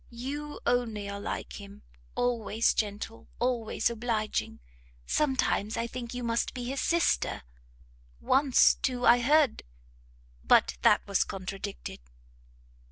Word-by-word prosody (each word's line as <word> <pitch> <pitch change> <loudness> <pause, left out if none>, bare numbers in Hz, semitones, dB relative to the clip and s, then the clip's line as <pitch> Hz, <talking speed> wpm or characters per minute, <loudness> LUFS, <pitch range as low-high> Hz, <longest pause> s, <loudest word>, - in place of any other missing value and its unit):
You 285 +5 -6
only 225 -5 0
are 200 0 -5
like 205 - -5
him! 200 +1 -13 0.3
always 230 -2 +1
gentle, 210 +1 -4
always 240 -3 0
obliging! 225 -2 -2 0.5
sometimes 260 - 0
I 230 - -1
think 235 0 -6
you 245 - -4
must 230 +2 -1
be 250 - -4
his 265 +3 -3
sister 335 - +1 0.8
once, 270 0 +4
too, 250 -1 -2
I 240 +1 +7
heard 285 +1 +3 0.8
but - - +4
that - - +4
was 200 - +2
contradicted." 195 +1 -6
235 Hz, 115 wpm, -29 LUFS, 210-255 Hz, 0.8 s, I